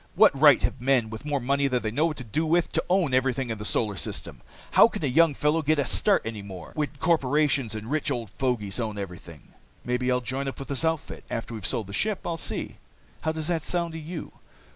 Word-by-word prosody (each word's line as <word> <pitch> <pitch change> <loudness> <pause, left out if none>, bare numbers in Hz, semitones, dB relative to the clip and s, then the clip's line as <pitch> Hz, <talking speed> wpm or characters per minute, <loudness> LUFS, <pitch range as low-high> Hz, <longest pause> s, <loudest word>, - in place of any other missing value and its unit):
What - - +6
right 145 -2 +7
have 130 - -1
men 125 -4 +2
with 110 +5 -8
more 145 -2 0
money 140 +2 +1
than 125 -2 0
they 110 - -1
know 150 +8 +2
what 155 - -4
to 125 - -6
do 120 +8 -1
with 170 +2 +2
to - - 0
own 180 -7 +2
everything 130 -1 +1
in 110 - -4
the - - -5
Solar 105 -1 0
System? - - -5 0.3
How - - +8
can - - -6
a - - +2
young 155 +3 +4
fellow 150 +4 +1
get 155 +1 +2
a 140 - +1
start 205 -2 +3
any 110 -2 -4
more, 95 -4 -9
when 150 -1 -1
corporations 140 -6 +2
and 110 0 -6
rich 155 -1 0
old 120 -7 -3
fogies 105 -2 -2
own 110 -3 -3
everything? 90 -5 -9 0.3
"Maybe 125 +1 0
I'll 125 - +2
join 130 +3 -3
up 135 - -4
with 135 - -8
this 140 +2 0
outfit. 160 -1 -2
After 115 0 -4
we've 110 -4 -3
sold 115 -5 -1
the 100 - -10
ship 210 - -1
I'll 170 - -1
see. - - -4 0.4
How 160 - 0
does 160 -1 -3
that 165 -2 0
sound 170 +1 -1
to 160 - -5
you?" 160 +1 -7
135 Hz, 240 wpm, -26 LUFS, 115-155 Hz, 0.4 s, How